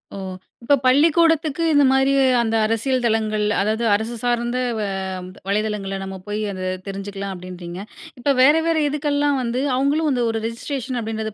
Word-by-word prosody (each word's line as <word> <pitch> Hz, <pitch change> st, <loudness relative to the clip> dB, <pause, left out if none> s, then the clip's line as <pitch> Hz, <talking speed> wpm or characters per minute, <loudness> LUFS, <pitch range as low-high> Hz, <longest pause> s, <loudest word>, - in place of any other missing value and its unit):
ஓ! -, -, -6 dB, 0.5 s
இப்ப 285 Hz, +5 st, +4 dB
பள்ளிக்கூடத்துக்கு 320 Hz, +3 st, +3 dB
இந்தமாரி 270 Hz, -2 st, +4 dB, 0.3 s
அந்த 225 Hz, -1 st, 0 dB
அரசியல் 240 Hz, +4 st, 0 dB
தளங்கள், 215 Hz, -2 st, +1 dB, 0.2 s
அதாவது 215 Hz, +3 st, 0 dB
அரசு 220 Hz, +3 st, -1 dB
சார்ந்த 240 Hz, 0 st, 0 dB, 0.2 s
வ -, -, -2 dB, 0.7 s
வலைதளங்கள்ல 200 Hz, -1 st, -1 dB
நம்ம 190 Hz, 0 st, -6 dB
போய் 205 Hz, +1 st, -3 dB
அத 185 Hz, -1 st, -4 dB, 0.2 s
தெரிஞ்சுக்கலாம் 200 Hz, 0 st, -5 dB
அப்பிடின்றீங்க. 180 Hz, -1 st, -8 dB, 0.4 s
இப்போ 280 Hz, +4 st, +1 dB
வேற 275 Hz, +3 st, +7 dB
வேற 330 Hz, -1 st, +2 dB
இதுக்கெல்லாம் 290 Hz, -1 st, 0 dB
வந்து, 240 Hz, 0 st, -2 dB, 0.2 s
அவுங்களும் 285 Hz, +4 st, +1 dB
வந்து 250 Hz, -3 st, +1 dB
ஒரு 225 Hz, 0 st, -1 dB
ரெஜிஸ்ட்ரேஷன் 255 Hz, +2 st, -4 dB
அப்பிடின்றது 220 Hz, -1 st, -4 dB
235 Hz, 145 wpm, -21 LUFS, 210-275 Hz, 0.7 s, வேற